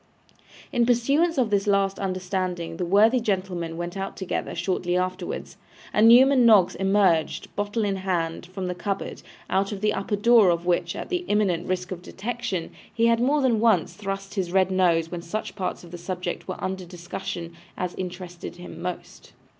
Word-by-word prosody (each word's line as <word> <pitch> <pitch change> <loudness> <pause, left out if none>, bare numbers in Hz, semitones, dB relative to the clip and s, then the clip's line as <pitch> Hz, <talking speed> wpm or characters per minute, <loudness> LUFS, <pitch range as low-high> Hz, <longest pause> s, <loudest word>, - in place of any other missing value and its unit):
In 240 -4 +2
pursuance 280 +8 +2
of 240 -5 +2
this 200 0 +1
last 195 -1 +2
understanding 185 -3 -3
the 180 - -1
worthy 215 +7 +5
gentlemen 185 -6 -2
went 175 +1 -4
out 195 0 -5
together 190 - -3
shortly 180 -1 -1
afterwards, 185 0 -3 0.4
and 215 +2 +5
Newman 255 +2 +7
Noggs 210 -6 +6
emerged, 195 -4 +1
bottle 205 +2 -1
in 195 -1 -1
hand, 175 -3 -2
from 185 +1 -5
the 180 - -2
cupboard, 195 +2 -4 0.3
out 195 +2 0
of 205 - -4
the 210 0 +2
upper 200 +1 -1
door 220 -1 +5
of 170 0 0
which, 175 -1 0
at - - -6
the 360 -1 -1
imminent 190 -5 +1
risk 180 0 -2
of 180 -2 -5
detection, 195 -3 -4 0.2
he 230 0 +1
had 230 0 +4
more 280 +5 +2
than 235 -4 +3
once 215 -7 +3
thrust 195 -1 -5
his 185 -4 -2
red 190 0 +3
nose 170 -3 +2
when 175 -1 -4
such 195 +7 -5
parts 190 -3 -3
of 170 - -13
the 175 - -7
subject 180 0 -4
were 185 - -4
under 190 0 -3
discussion 175 -1 -6 0.2
as 180 -1 -2
interested 180 -1 -7
him 175 -2 -10
most. 180 0 -7
190 Hz, 180 wpm, -25 LUFS, 175-210 Hz, 0.4 s, Newman